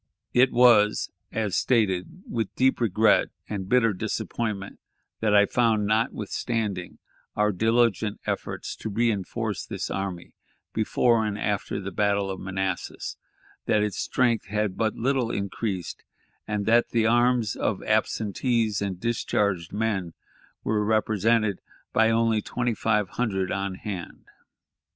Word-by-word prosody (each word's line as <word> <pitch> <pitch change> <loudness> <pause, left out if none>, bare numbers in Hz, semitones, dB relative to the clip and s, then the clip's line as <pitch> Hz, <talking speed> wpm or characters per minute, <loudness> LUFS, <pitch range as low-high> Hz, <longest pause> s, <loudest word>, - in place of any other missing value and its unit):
It 125 +1 +5
was, 115 -4 +5 0.2
as 110 -4 -1
stated, 110 - +1
with 115 -4 -3
deep 130 -1 +2
regret 110 0 +4 0.2
and 95 -3 -5
bitter 120 -4 +4
disappointment 100 +1 -3 0.4
that 105 -2 +2
I 105 0 +7
found, 110 -2 +2
notwithstanding 110 -2 -1 0.4
our 105 0 +2
diligent 110 0 +1
efforts - - -4
to - - -5
reënforce 105 -3 -1
this - - -4
army 95 -3 -4 0.4
before 110 +1 +2
and 105 -1 -2
after 105 -1 -2
the 100 0 -5
battle 100 0 +1
of 95 - -6
Manassas, 95 -1 -3 0.5
that 105 -1 +3
its 105 -3 -2
strength 120 -4 +1
had 105 -2 -1
but 110 0 0
little 130 -1 0
increased, 100 -3 -3 0.4
and 105 -1 -2
that 115 +2 +4
the 115 -2 +1
arms 120 -1 +3
of - - -1
absentees 110 0 0
and 95 -3 -3
discharged 100 -6 0
men 100 -6 -1 0.5
were 105 -1 +1
represented 110 -1 +1 0.3
by 110 0 +4
only 115 -1 +2
twenty 120 +2 -1
five 105 -2 +1
hundred 95 -6 -1
on 95 -1 -2
hand. 95 -3 -7
105 Hz, 125 wpm, -26 LUFS, 100-115 Hz, 0.5 s, I